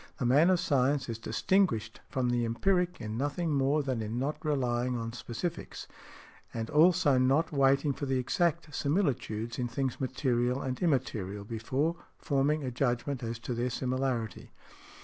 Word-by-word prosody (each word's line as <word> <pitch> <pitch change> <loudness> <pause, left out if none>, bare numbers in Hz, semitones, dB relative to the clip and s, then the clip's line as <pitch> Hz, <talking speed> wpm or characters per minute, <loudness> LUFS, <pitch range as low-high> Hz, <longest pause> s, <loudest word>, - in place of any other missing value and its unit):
The 125 - -2
man 145 +8 +5
of 185 -2 +3
science 140 -2 +1
is 115 -1 -4
distinguished 115 - +1
from 130 -3 0
the 120 -1 +1
empiric 180 +10 +1
in 110 +1 -4
nothing 150 +3 -1
more 140 +2 +2
than 130 -4 -2
in 110 +2 -3
not 145 +7 -2
relying 125 -4 0
on 115 0 -4
specifics, 125 +7 -5 0.6
and 115 -1 -4
also 155 -3 +5
not 135 +6 +2
waiting 140 0 +3
for 140 - -5
the 130 0 +1
exact 165 +4 0
similitudes 130 - -1
in 125 - 0
things 130 +2 -3
material 125 -1 0
and 130 -2 -4
immaterial 110 - -1
before 130 +10 -1 0.2
forming 145 +1 +1
a 130 - -3
judgment 125 +2 -1
as 115 -1 -3
to 125 - -2
their 120 +2 -1
similarity. 125 -2 -2
130 Hz, 155 wpm, -30 LUFS, 120-150 Hz, 0.6 s, man